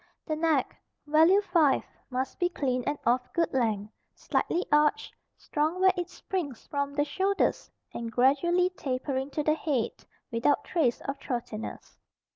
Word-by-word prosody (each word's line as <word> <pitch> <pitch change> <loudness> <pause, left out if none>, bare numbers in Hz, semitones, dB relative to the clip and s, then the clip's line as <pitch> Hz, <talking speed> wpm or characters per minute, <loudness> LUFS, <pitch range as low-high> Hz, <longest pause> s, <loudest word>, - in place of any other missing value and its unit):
The 310 - -1
neck 310 -4 +1 0.3
(value 320 +7 +5
5) 335 -8 +3 0.3
must 260 +1 -3
be 355 - +2
clean 255 -7 -1
and 290 - 0
of 245 +2 +3
good 335 -3 +1
length, 220 -5 0 0.2
slightly 350 +2 -1
arched, 300 +8 +3 0.2
strong 310 +4 -1
where 375 0 +5
it 355 -1 -3
springs 335 -10 -5
from 280 0 -3
the 290 0 +2
shoulders 380 +7 0 0.2
and 230 -1 -5
gradually 345 +10 +3
tapering 265 -3 -3
to 300 +1 -2
the 305 - +3
head, 285 -7 -1 0.4
without 235 +5 +2
trace 290 -9 0
of 275 0 -4
throatiness. 235 -4 -6
290 Hz, 145 wpm, -28 LUFS, 255-340 Hz, 0.4 s, value